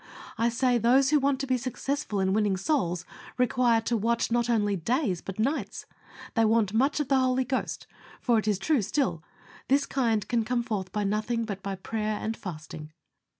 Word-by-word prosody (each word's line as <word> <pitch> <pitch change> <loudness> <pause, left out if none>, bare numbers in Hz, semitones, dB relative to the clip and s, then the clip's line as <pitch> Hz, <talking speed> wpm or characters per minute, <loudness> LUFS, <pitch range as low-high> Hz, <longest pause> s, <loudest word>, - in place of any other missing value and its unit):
I 230 +1 +2
say 245 +1 +2
those 260 +4 +4
who 300 - +5
want 275 -1 +1
to - - -1
be 255 -1 +1
successful 255 -2 -3
in 190 0 +1
winning 205 -2 +1
souls 180 - 0 0.3
require 245 -2 +3
to 235 +1 -1
watch 230 +2 0
not 240 0 +1
only 205 -3 +2
days 200 - 0
but 195 - -7
nights. 270 +8 -2 0.5
They 225 - +3
want 220 -2 +2
much 270 +7 +2
of 295 - -1
the 270 -1 +3
Holy 260 0 +2
Ghost, 260 +1 -3 0.3
for 235 -3 +2
it 215 - -4
is 210 -2 +2
true 280 +6 +1
still, 190 - -1 0.4
"This 275 +2 +3
kind 230 -6 0
can 235 -2 +1
come 240 +1 -1
forth 205 -6 -3
by 210 -1 -1
nothing, 215 +3 -1
but 200 -3 -5
by 195 0 -4
prayer 215 +2 -3
and 220 +1 -3
fasting." 155 -5 -8
230 Hz, 195 wpm, -27 LUFS, 205-255 Hz, 0.5 s, who